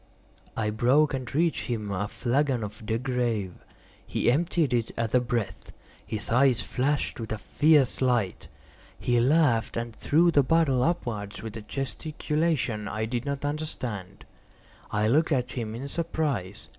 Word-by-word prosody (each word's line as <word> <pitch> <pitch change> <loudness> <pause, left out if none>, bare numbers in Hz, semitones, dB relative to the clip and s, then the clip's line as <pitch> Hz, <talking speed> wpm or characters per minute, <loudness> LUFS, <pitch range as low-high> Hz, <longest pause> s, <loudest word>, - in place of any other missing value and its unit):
I 105 -1 0
broke 130 +7 +3
and 130 -3 -4
reached 165 +1 +1
him 110 -4 -3
a 100 +1 -1
flagon 130 +1 0
of 105 +1 -7
De 110 - +1
Grâve. 120 -7 -1 0.5
He - - +1
emptied 160 -1 +1
it 115 -2 +1
at 115 -1 -1
a 125 - +6
breath. 115 -6 -3 0.3
His 105 -1 -4
eyes 125 0 +4
flashed 140 +2 -1
with 110 -1 -5
a 110 - -1
fierce 145 +4 +3
light. 120 -7 +1 0.5
He 120 -1 +2
laughed 125 -4 +3
and 115 -1 -4
threw 170 +4 +3
the 145 - +5
bottle 140 -3 +3
upwards 110 - -2
with 110 -1 -6
a 110 - -5
gesticulation 140 -2 -2
I 110 +2 -2
did 120 +3 -3
not 140 0 -2
understand. 125 - -5 0.6
I 105 +1 +1
looked 155 +8 +3
at 125 -4 +1
him 115 -3 -4
in 130 +4 -5
surprise. 145 - -2
125 Hz, 155 wpm, -27 LUFS, 110-145 Hz, 0.6 s, a